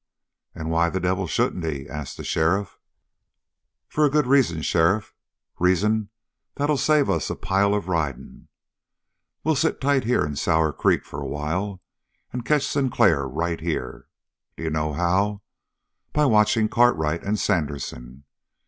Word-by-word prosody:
"And 80 -1 -4
why 85 +1 +2
the 95 - -2
devil 90 +1 -1
shouldn't 90 - 0
he?" 70 -4 -4
asked 75 -2 -7
the - - -7
sheriff. 90 +4 0 1.1
"For 155 - 0
a 150 - +5
good 150 0 +2
reason, 125 - +2
sheriff, 90 +5 +1 0.5
reason 100 +4 +2 0.5
that'll 145 +1 +1
save 150 -2 +3
us - - 0
a - - -2
pile 100 +1 +1
of 100 -4 -3
riding. 80 -8 -3 1.0
We'll 160 - +2
sit 160 +4 0
tight 135 -2 +1
here 125 -6 +2
in 75 -1 -4
Sour 80 +1 +1
Creek - - +1
for 70 - -7
a 70 - -4
while 90 +7 -3 0.5
and 125 -1 -4
catch 145 +2 +2
Sinclair 100 - +2
right 85 +5 -2
here. 85 -1 -4 0.5
D'you 80 -1 -3
know 75 0 -1
how? 95 +5 0 0.7
By 150 0 +3
watching 110 -2 +3
Cartwright 85 -10 +2
and 105 +1 -1
Sandersen. 70 - -3
95 Hz, 145 wpm, -24 LUFS, 80-110 Hz, 1.1 s, a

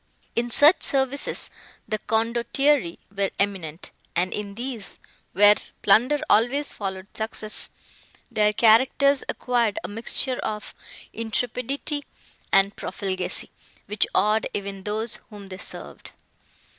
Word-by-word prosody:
In 240 +1 0
such 295 +8 +6
services 270 0 -1 0.4
the 215 - -1
Condottieri 235 -1 +1 0.2
were 200 -1 +1
eminent, 185 -5 -2 0.2
and 180 +2 +1
in 200 -1 -5
these, 240 -3 -5 0.3
where 205 +2 +8 0.3
plunder 245 +9 +4
always 255 +7 +3
followed 190 -1 -6
success, 215 -1 -2 0.6
their 210 -1 +3
characters 260 +6 +4
acquired 235 -4 0
a - - -3
mixture 235 +4 0
of 210 -1 -4 0.4
intrepidity 250 +6 -2 0.5
and 195 +1 +4
profligacy, 185 -1 -3 0.3
which 210 0 +2
awed 215 +1 +3
even 195 -1 -5
those 215 +2 -1
whom 205 -3 -11
they 185 0 -7
served. - - -8
215 Hz, 110 wpm, -24 LUFS, 200-250 Hz, 0.6 s, where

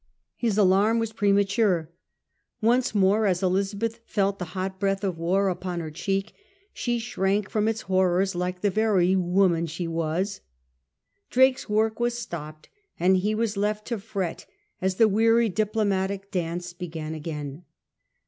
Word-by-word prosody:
His 225 -4 -1
alarm 205 +3 +4
was 225 -1 -2
premature. 200 -4 +2 0.7
Once 240 +1 +2
more 205 +2 +3
as 180 -1 0
Elizabeth 200 +5 0
felt 200 -1 0
the 180 - -3
hot 190 0 -3
breath 195 +1 0
of 185 -4 -2
war 190 +4 +1
upon 180 -1 -3
her 160 -2 -5
cheek 195 +5 -2 0.4
she 240 -1 -1
shrank 205 -3 -1
from 215 0 +1
its 225 0 -1
horrors 185 0 +1
like 180 +1 -3
the 205 - +2
very 190 -3 +3
woman 180 -2 +2
she 165 +2 -4
was. 165 +4 -2 0.9
Drake's 260 -1 +3
work 220 +1 +1
was 240 0 0
stopped, 155 -8 -7 0.3
and 185 +2 +4
he 210 +4 0
was 220 -1 -1
left 210 +1 -1
to 235 -3 -2
fret 195 -5 -4 0.3
as 190 0 0
the 225 +3 +5
weary 225 +2 +3
diplo 215 +2 0
matic 195 0 -2
dance 175 -1 -3
began 165 -3 -6
again. 150 -1 -6
195 Hz, 150 wpm, -25 LUFS, 180-215 Hz, 0.9 s, the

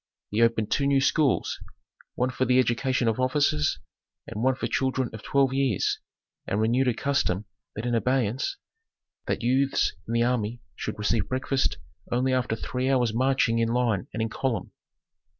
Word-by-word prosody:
He 105 +2 +1
opened 115 -2 +2
two 140 - +2
new 140 -1 +4
schools, 140 -1 +1 0.6
one 125 +1 0
for 130 0 0
the 125 0 +3
education 130 0 +1
of 115 +1 +1
officers, 130 - +2 0.5
and 105 - -6
one 130 +1 +3
for - - -3
children 130 -2 0
of 110 - -7
twelve 135 +1 +2
years, 135 -7 +1 0.5
and 100 - 0
renewed 120 +4 +2
a 125 - +3
custom 110 -9 0 0.3
then 110 - -4
in 120 - 0
abeyance, 125 0 0 0.7
that - - -1
youths 135 +3 +2
in 115 - -3
the 115 - +3
army 120 -1 0 0.2
should - - -5
receive 105 0 0
breakfast 130 +1 0 0.3
only 130 +2 +1
after 125 -3 0
three 125 +3 -2
hours' 125 -4 +2
marching 125 -1 +2
in 115 0 +1
line 115 -5 0
and 110 - -2
in 110 - -2
column. 120 -1 -2
125 Hz, 170 wpm, -26 LUFS, 115-130 Hz, 0.7 s, new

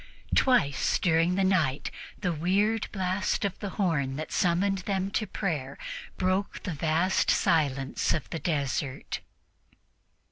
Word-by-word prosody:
Twice 190 - +3
during 170 +1 +2
the 195 - +2
night 165 -8 +1 0.3
the 180 -2 0
weird 200 +7 +1
blast 190 +1 0
of 195 -2 -3
the 200 - -4
horn 150 -9 +1
that 155 +2 -5
summoned 190 +3 +2
them 195 0 -2
to 215 - -1
prayer 170 -8 -3 0.4
broke 185 +2 0
the 180 - -3
vast 165 +5 +1
silence 140 -4 +2
of 155 - -1
the 165 - -3
desert. 140 -3 -2
180 Hz, 130 wpm, -28 LUFS, 150-195 Hz, 0.4 s, Twice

